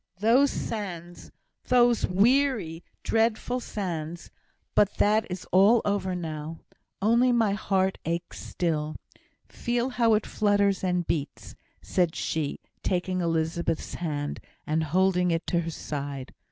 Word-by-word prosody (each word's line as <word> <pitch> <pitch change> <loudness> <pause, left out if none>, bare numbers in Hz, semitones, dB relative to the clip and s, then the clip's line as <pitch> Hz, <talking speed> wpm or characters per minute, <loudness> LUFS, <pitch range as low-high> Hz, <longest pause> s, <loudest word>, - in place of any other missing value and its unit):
those 235 +8 +4
sands, 175 -9 -5 0.4
those 240 -2 +4
weary, 210 - +2 0.2
dreadful 230 +2 +1
sands! 175 -7 -5 0.4
But 205 -1 +3
that 215 +2 +3
is 180 0 -5
all 200 +6 +6
over 200 -2 0
now. 160 -2 -5 0.4
Only 235 +4 +4
my 230 -4 +3
heart 190 -2 0
aches 170 +2 -3
still. 155 -3 -2 0.5
Feel 240 +1 -1
how 230 -3 +3
it 215 - 0
flutters 200 -2 +1
and 180 -2 0
beats," 150 -4 -3 0.3
said 175 -3 +1
she, 155 -3 -2 0.2
taking 185 0 -1
Elizabeth's 165 0 -1
hand, 145 -4 -3 0.3
and 160 +1 0
holding 180 +2 +2
it 165 -1 0
to 170 - +1
her 165 -1 -3
side. 140 -4 -5
185 Hz, 125 wpm, -27 LUFS, 165-215 Hz, 0.5 s, all